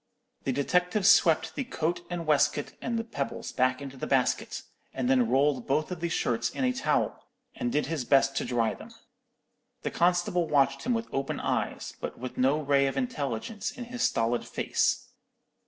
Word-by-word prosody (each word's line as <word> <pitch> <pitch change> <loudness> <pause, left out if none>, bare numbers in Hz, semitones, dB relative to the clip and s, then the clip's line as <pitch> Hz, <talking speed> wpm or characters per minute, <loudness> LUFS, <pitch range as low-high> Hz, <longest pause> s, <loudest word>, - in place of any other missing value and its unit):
"The 135 - +1
detective 180 +8 +1
swept 170 -4 +5
the 275 - -2
coat 175 -9 -2
and 175 -2 -4
waistcoat 150 -1 +2
and 235 -1 -1
the 225 - -1
pebbles 145 -12 -4
back 130 +1 +1
into 135 -1 -8
the - - -4
basket, 130 -2 0 0.3
and 130 -2 -1
then 125 -3 +3
rolled 135 0 +2
both 155 +5 0
of 180 - -4
the 170 0 -2
shirts 120 -6 0
in - - -4
a 255 0 +2
towel, 270 +2 -1 0.3
and 245 -1 -2
did 150 - +1
his 160 -5 -2
best 135 +1 +3
to - - +1
dry 115 -3 +1
them. - - -11 0.9
The - - -2
constable 175 0 +2
watched 140 - +2
him 245 - +2
with 230 0 -3
open 135 0 -2
eyes, - - -2
but - - -5
with 125 0 -6
no 135 +4 +2
ray 140 -2 +3
of 135 - -3
intelligence 205 - -2
in 250 - -7
his 245 0 -6
stolid 115 - +1
face. - - 0
145 Hz, 185 wpm, -28 LUFS, 135-180 Hz, 0.9 s, swept